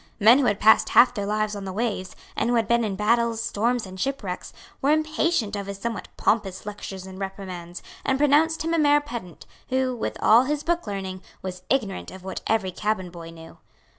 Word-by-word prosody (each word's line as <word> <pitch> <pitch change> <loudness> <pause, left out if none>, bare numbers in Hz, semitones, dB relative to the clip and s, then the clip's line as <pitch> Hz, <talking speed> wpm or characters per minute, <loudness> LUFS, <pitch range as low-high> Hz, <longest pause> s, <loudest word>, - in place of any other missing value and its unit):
Men 230 +5 +7
who 275 - +2
had 205 -4 +1
passed 220 +1 +5
half 245 0 +6
their 205 -4 -3
lives 215 0 0
on 200 - -6
the 190 - -5
waves, 200 -2 -3 0.2
and - - 0
who 245 - +2
had 225 -3 +2
been 235 0 +3
in 205 -3 -2
battles, 230 +2 +2
storms 235 +1 0
and 190 0 -10
shipwrecks, 220 -9 -3 0.3
were 275 - +2
impatient 310 -6 +1
of 200 -1 -4
his 200 -1 -5
somewhat 230 +2 -4
pompous 195 -4 0
lectures 200 -2 -7
and 190 0 -10
reprimands, 185 -3 -6 0.2
and 265 - +1
pronounced 300 +3 +3
him 330 - 0
a 335 - +2
mere 295 -1 +5
pedant, 235 - -8 0.2
who, 260 -1 0
with 230 - -3
all 230 +4 +6
his 295 +1 -1
book 345 -6 -1
learning, 190 -2 -4 0.2
was 185 -1 -5
ignorant 220 -8 -1
of 190 -1 -11
what 190 - -5
every 205 -4 +1
cabin 190 -2 -2
boy 170 -1 -9
knew. 165 0 -13
215 Hz, 205 wpm, -25 LUFS, 190-255 Hz, 0.3 s, Men